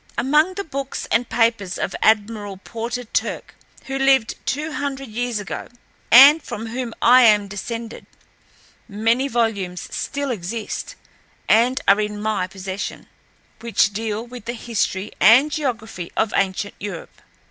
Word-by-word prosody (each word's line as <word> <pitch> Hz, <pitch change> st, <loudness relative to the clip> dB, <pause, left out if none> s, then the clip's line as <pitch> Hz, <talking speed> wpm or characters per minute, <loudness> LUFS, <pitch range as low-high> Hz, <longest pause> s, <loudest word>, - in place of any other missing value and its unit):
"Among 300 Hz, +8 st, +2 dB
the 400 Hz, -, -3 dB
books 275 Hz, -5 st, -5 dB
and 235 Hz, +1 st, +1 dB
papers 225 Hz, -5 st, +1 dB
of -, -, -3 dB
Admiral 210 Hz, -2 st, +1 dB
Porter 230 Hz, +5 st, -5 dB
Turck, 230 Hz, -, -3 dB, 0.3 s
who 270 Hz, 0 st, -3 dB
lived 270 Hz, -4 st, +3 dB
two 305 Hz, +3 st, -2 dB
hundred 275 Hz, -3 st, -4 dB
years 240 Hz, 0 st, -2 dB
ago, 205 Hz, -, -6 dB, 0.4 s
and 280 Hz, +6 st, +9 dB
from 230 Hz, -5 st, -6 dB
whom 235 Hz, 0 st, -5 dB
I 250 Hz, +2 st, +7 dB
am 210 Hz, -2 st, +4 dB
descended, 230 Hz, +3 st, -7 dB, 0.8 s
many 230 Hz, +5 st, +1 dB
volumes 210 Hz, -8 st, -2 dB
still 280 Hz, -1 st, -3 dB
exist, 220 Hz, -, -5 dB, 0.5 s
and 245 Hz, +5 st, +3 dB
are 200 Hz, +2 st, +5 dB
in 210 Hz, 0 st, -3 dB
my 210 Hz, -3 st, -1 dB
possession, 190 Hz, +1 st, -6 dB, 0.5 s
which 210 Hz, -3 st, +1 dB
deal 220 Hz, +1 st, -3 dB
with 245 Hz, -2 st, -11 dB
the 235 Hz, -, -3 dB
history 215 Hz, -4 st, -2 dB
and 255 Hz, +8 st, +6 dB
geography 225 Hz, -, -4 dB
of 220 Hz, -, +1 dB
ancient 195 Hz, +1 st, -1 dB
Europe. 200 Hz, -5 st, -8 dB
230 Hz, 135 wpm, -21 LUFS, 205-255 Hz, 0.8 s, and